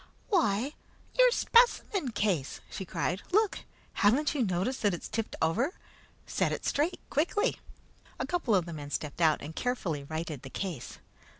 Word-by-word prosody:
"Why, 275 - +2 0.4
your - - +7
specimen 465 - +3
case!" 190 - 0
she 190 - -5
cried. 185 +2 -1
"Look! 425 +1 +3 0.3
Haven't 250 +9 +3
you 280 -5 +1
noticed 190 +6 -1
that 205 -4 +2
it's - - -7
tipped 225 -1 -3
over? 235 - +1 0.5
Set - - 0
it - - -3
straight, 310 +6 +1
quickly!" 385 - +1 0.6
A - - -2
couple 335 - +1
of 180 -3 +2
the 170 - -6
men 145 -2 -6
stepped 150 +2 -4
out 155 -2 +4
and 155 +2 -7
carefully 190 - -1
righted 155 -1 -4
the 135 - -9
case. 175 -4 -5
210 Hz, 160 wpm, -30 LUFS, -, 0.6 s, your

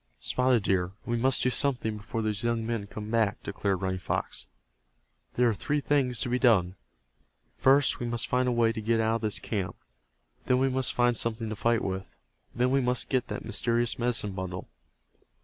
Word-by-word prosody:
"Spotted 125 - +1
Deer, 95 -1 0
we 120 - -1
must 130 +3 +3
do 125 - +2
something 125 -6 0
before 110 +2 -4
those 105 -1 -1
young 115 -1 0
men 115 -3 -3
come 105 +1 -7
back," 115 -1 +1
declared 100 -2 -2
Running 95 0 -1
Fox. - - -3 0.9
"There 125 0 +4
are 115 - +2
three 145 +8 -1
things 135 -4 +1
to - - 0
be 125 +1 +1
done. 95 -8 +4 0.8
First 135 -1 +3
we 120 - -3
must 120 -1 0
find 125 0 +1
a - - +2
way 120 -1 +3
to 110 - -5
get 115 +1 +1
out 110 +1 +2
of - - -13
this 110 -2 0
camp. 95 -5 -3 0.7
Then 125 - +4
we 135 +1 +2
must 130 0 0
find 120 0 +3
something 115 0 0
to 110 - -4
fight 115 +2 +1
with. 95 0 -5 0.4
Then 125 +1 +2
we 135 0 +3
must 125 0 0
get 130 -2 0
that - - -5
mysterious 120 0 0
medicine 120 -4 -1
bundle." 95 -1 -6
115 Hz, 195 wpm, -28 LUFS, 105-125 Hz, 0.9 s, There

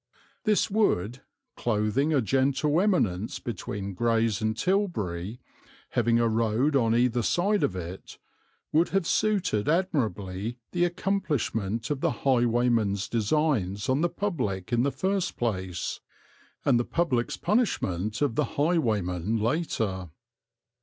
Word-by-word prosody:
This 215 -2 +3
wood, 130 - +1 0.3
clothing 120 +6 0
a 145 -4 +3
gentle 135 - +2
eminence 110 - +1
between 100 -3 -5
Grays 115 0 +1
and 110 0 0
Tilbury, 115 - -1 0.5
having 115 0 +2
a 115 - +3
road 115 +6 +1
on 115 -4 +3
either 120 0 +2
side 195 - +1
of 95 - 0
it, 90 +1 -7 0.5
would 165 +3 +3
have 195 -2 +1
suited 185 - +1
admirably 115 - -1
the 175 -1 +2
accomplishment 150 - -1
of 145 -2 -2
the - - -2
highwayman's 120 -5 +2
designs 115 - 0
on 130 +3 +2
the 175 - +2
public 125 - -3
in 120 - +3
the 140 +2 +1
first 190 +2 -1
place, 95 -7 -2 0.7
and 125 -4 +4
the - - +1
public's 130 -6 0
punishment 110 - 0
of 140 -5 +1
the - - -2
highwayman 110 - +1
later. 110 - -1
120 Hz, 125 wpm, -27 LUFS, 105-160 Hz, 0.7 s, and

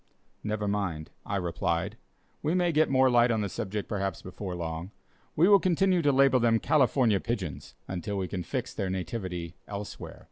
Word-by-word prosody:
"Never 105 -1 -2
mind," 95 -7 -2 0.2
I - - -2
replied, 90 +2 -1 0.5
"we 155 +4 0
may 175 -1 +2
get 155 0 +3
more 130 0 +4
light 120 -1 +5
on 110 -2 +1
the 100 - -2
subject, 105 +1 -4
perhaps, 100 -2 -3
before 95 0 -6
long. 85 +1 -4 0.5
We 170 +4 +5
will 200 -1 +7
continue 185 0 +2
to 145 -2 +3
label 135 -1 +5
them 115 -1 +4
'California 130 -8 +3
Pigeons' 100 - -4
until 95 +2 -3
we 95 -1 -1
can 90 -1 -4
fix 85 - -4
their 95 - -2
nativity 90 -2 -4
elsewhere." 100 0 -7
105 Hz, 175 wpm, -28 LUFS, 95-130 Hz, 0.5 s, will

